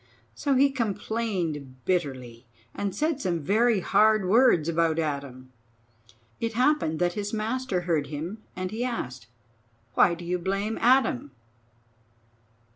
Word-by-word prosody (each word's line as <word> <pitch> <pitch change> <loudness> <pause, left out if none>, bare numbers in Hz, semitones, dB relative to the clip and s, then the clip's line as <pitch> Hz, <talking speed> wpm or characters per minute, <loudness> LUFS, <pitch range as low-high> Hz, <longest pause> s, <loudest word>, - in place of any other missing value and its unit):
So 280 -2 0
he 275 +2 +4
complained 190 - -3
bitterly, 130 -10 -2 0.3
and 200 -2 -3
said 305 -2 0
some 175 -6 -1
very 220 +4 +3
hard 215 0 +3
words 200 - +4
about 165 -1 +1
Adam. 140 -5 -4 0.9
It 230 0 -2
happened 250 - +2
that 175 +1 +1
his 205 +2 -4
master 220 -2 -1
heard 165 -5 0
him, 160 +9 -5 0.2
and 185 0 -4
he 225 +3 -3
asked: 130 - -4 0.7
"Why 170 - +4
do 175 0 -10
you 180 +1 -1
blame 195 +4 -2
Adam? 245 - +3
185 Hz, 125 wpm, -26 LUFS, 155-230 Hz, 0.9 s, he